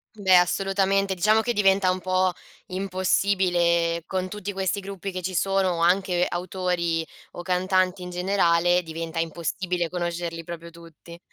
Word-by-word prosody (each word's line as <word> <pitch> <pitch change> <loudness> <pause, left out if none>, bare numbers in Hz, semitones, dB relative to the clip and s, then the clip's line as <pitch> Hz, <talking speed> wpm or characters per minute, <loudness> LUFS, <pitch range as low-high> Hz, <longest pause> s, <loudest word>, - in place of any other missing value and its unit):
Beh, 190 -3 +4
assolutamente. 195 +2 +1
Diciamo 215 +4 +3
che 240 +1 -1
diventa 195 -2 +3
un 185 - -2
po' 185 0 +1 0.4
impossibile, 180 -3 +1
con 185 -1 -2
tutti 205 0 -5
questi 190 +1 -1
gruppi 195 0 -6
che 185 0 -5
ci 185 +1 -4
sono, 190 -2 +1
anche, 180 0 +2
ehm, - - +4
autori 175 -2 -2 0.3
o 175 - -7
cantanti 185 0 +1
in 180 - -6
generale, 180 -1 +2
diventa 165 0 -5
impossibile 170 +2 -2
conoscerli 170 -1 -4
proprio 170 0 -8
tutti. 170 0 -14
180 Hz, 145 wpm, -25 LUFS, 170-190 Hz, 0.4 s, Beh